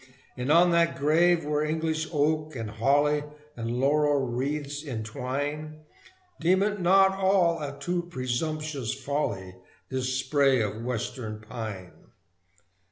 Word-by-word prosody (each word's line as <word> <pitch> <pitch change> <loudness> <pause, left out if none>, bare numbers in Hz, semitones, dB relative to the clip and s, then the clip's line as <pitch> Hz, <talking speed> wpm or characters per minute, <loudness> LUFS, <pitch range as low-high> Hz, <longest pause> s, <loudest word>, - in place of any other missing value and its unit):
And 125 +3 -1
on 175 +2 +6
that 170 0 +2
grave 165 +3 +3
where 150 0 0
English 155 0 -1
oak, 155 0 0
and 115 -3 -5
holly, 145 +6 +2 0.3
And 115 -1 -4
laurel 145 0 +2
wreaths 140 +4 -3
entwine, 145 +5 -4 0.6
Deem 185 +3 +3
it 205 -1 -1
not 190 +2 +5
all 190 -4 +2
a 140 -1 -5
too 175 +1 -2
presumptuous 135 -1 -2
folly, 125 -10 -3 0.3
This 130 -1 -2
spray 135 0 +3
of 110 0 -2
Western 115 -2 -4
pine! 110 -5 -7
145 Hz, 120 wpm, -27 LUFS, 125-160 Hz, 0.6 s, on